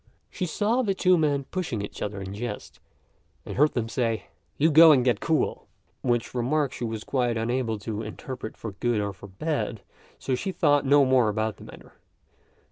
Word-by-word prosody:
She 180 Hz, -, -3 dB
saw 220 Hz, +8 st, +1 dB
two 190 Hz, -5 st, +3 dB
men 145 Hz, -4 st, +1 dB
pushing 160 Hz, -, -3 dB
each 100 Hz, -, -8 dB
other 105 Hz, -1 st, -3 dB
in 95 Hz, +1 st, -6 dB
jest, 105 Hz, 0 st, -6 dB, 0.7 s
and -, -, -6 dB
heard 150 Hz, +3 st, +3 dB
them 115 Hz, -3 st, -1 dB
say, 115 Hz, -1 st, -2 dB, 0.3 s
"You 160 Hz, +3 st, +3 dB
go 160 Hz, +2 st, +9 dB
and 130 Hz, -4 st, +4 dB
get 125 Hz, -, +2 dB
cool," 160 Hz, -2 st, -1 dB, 0.3 s
which 120 Hz, -2 st, 0 dB
remark 135 Hz, +3 st, 0 dB
she -, -, -6 dB
was 110 Hz, -2 st, -3 dB
quite 120 Hz, -3 st, 0 dB
unable 115 Hz, 0 st, -1 dB
to 105 Hz, +1 st, -5 dB
interpret 125 Hz, -1 st, -7 dB
for 110 Hz, -, -6 dB
good 115 Hz, +3 st, -1 dB
or 100 Hz, -1 st, -2 dB
for 100 Hz, -, -12 dB
bad, 115 Hz, 0 st, -3 dB, 0.3 s
so 135 Hz, -, -3 dB
she 190 Hz, +10 st, -2 dB
thought 145 Hz, -6 st, +2 dB
no 140 Hz, 0 st, +6 dB
more 130 Hz, -4 st, +4 dB
about 110 Hz, 0 st, -2 dB
the -, -, -12 dB
matter. -, -, -14 dB
125 Hz, 185 wpm, -26 LUFS, 110-150 Hz, 0.7 s, go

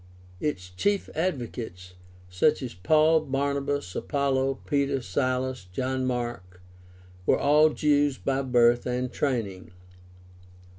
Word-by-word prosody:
Its 90 Hz, -11 st, -3 dB
chief 200 Hz, -, -1 dB
advocates, 120 Hz, -, -4 dB, 0.3 s
such 135 Hz, +12 st, +1 dB
as 125 Hz, -, -5 dB
Paul, 155 Hz, -, +4 dB
Barnabas, 140 Hz, -, -2 dB
Apollos, 135 Hz, -2 st, 0 dB
Peter, 140 Hz, -1 st, +1 dB
Silas, 130 Hz, -3 st, -2 dB
John 130 Hz, +5 st, -1 dB
Mark, 120 Hz, -8 st, -4 dB, 0.7 s
were -, -, +4 dB
all 150 Hz, +2 st, +5 dB
Jews 145 Hz, -2 st, +2 dB
by 135 Hz, 0 st, -1 dB
birth 120 Hz, -2 st, +3 dB
and 125 Hz, 0 st, -2 dB
training. 110 Hz, -10 st, -2 dB
130 Hz, 105 wpm, -26 LUFS, 120-145 Hz, 0.7 s, all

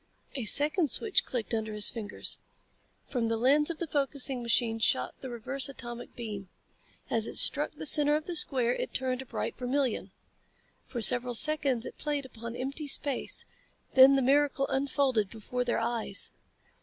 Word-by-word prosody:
A 255 Hz, -5 st, -4 dB
second 295 Hz, -, +4 dB
switch 420 Hz, -, +1 dB
clicked 240 Hz, -2 st, -5 dB
under 220 Hz, -1 st, -3 dB
his 210 Hz, 0 st, +1 dB
fingers. 210 Hz, -3 st, -4 dB, 0.7 s
From 240 Hz, -4 st, -2 dB
the 225 Hz, 0 st, -1 dB
lense 285 Hz, +6 st, +3 dB
of 335 Hz, -, -4 dB
the 340 Hz, -, -4 dB
focusing 275 Hz, -3 st, -2 dB
machine 230 Hz, -1 st, 0 dB
shot 130 Hz, -11 st, 0 dB
the 260 Hz, -, -8 dB
reverse 255 Hz, +3 st, -3 dB
atomic 240 Hz, -2 st, -9 dB
beam. 210 Hz, -5 st, -7 dB, 0.6 s
As 225 Hz, -1 st, +3 dB
it -, -, -6 dB
struck 295 Hz, +2 st, +4 dB
the 310 Hz, -, -8 dB
center 295 Hz, 0 st, +6 dB
of 305 Hz, 0 st, -3 dB
the 350 Hz, -, -5 dB
square 250 Hz, -6 st, +3 dB
it -, -, -5 dB
turned 255 Hz, 0 st, -1 dB
a 265 Hz, -, -12 dB
bright -, -, -5 dB
vermilion. 255 Hz, 0 st, -2 dB, 0.8 s
For 245 Hz, -3 st, -5 dB
several 245 Hz, +2 st, +6 dB
seconds 275 Hz, -4 st, +2 dB
it -, -, -10 dB
played 290 Hz, -2 st, -3 dB
upon 235 Hz, -2 st, -9 dB
empty 275 Hz, +4 st, -4 dB
space, 280 Hz, -1 st, 0 dB, 0.5 s
then 265 Hz, +1 st, +7 dB
the 270 Hz, -, +1 dB
miracle 280 Hz, +1 st, +2 dB
unfolded 265 Hz, -6 st, 0 dB
before 235 Hz, +3 st, -4 dB
their 245 Hz, -, -1 dB
eyes. 230 Hz, -3 st, -2 dB
255 Hz, 170 wpm, -28 LUFS, 230-285 Hz, 0.8 s, then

